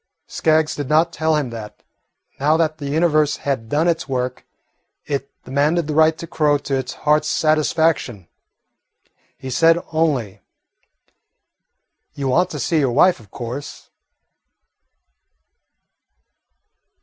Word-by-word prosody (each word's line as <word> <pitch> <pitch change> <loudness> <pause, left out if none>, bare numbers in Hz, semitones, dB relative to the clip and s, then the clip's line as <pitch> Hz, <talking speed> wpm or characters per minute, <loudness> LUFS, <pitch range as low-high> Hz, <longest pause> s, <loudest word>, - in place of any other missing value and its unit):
Skaggs 155 -1 +1
did 145 -2 -5
not 160 +2 +3
tell 160 0 +1
him 145 -5 -1
that, 110 -2 -9 0.6
now 150 +3 +3
that 160 -1 0
the 140 -2 -5
Universe 155 -1 +2
had 130 -6 -3
done 155 +6 +1
its 165 -3 -1
work, 125 -1 -3 0.6
it 140 -1 -3 0.2
demanded 145 +5 +1
the 150 - -3
right 160 +1 +4
to - - -7
crow 150 -3 +1
to 140 -1 -3
its 130 - -3
heart's 150 0 +3
satisfaction. 155 - +1 1.1
He 130 - -7
said 165 +5 +4
only, 145 -11 -1 1.7
"You 140 -2 -2
want 170 +8 +2
to - - -6
see 165 -3 +1
your 135 -4 +1
wife, 180 +6 +4
of 110 -4 -17
course?" 125 +7 -8
150 Hz, 125 wpm, -20 LUFS, 135-160 Hz, 1.7 s, right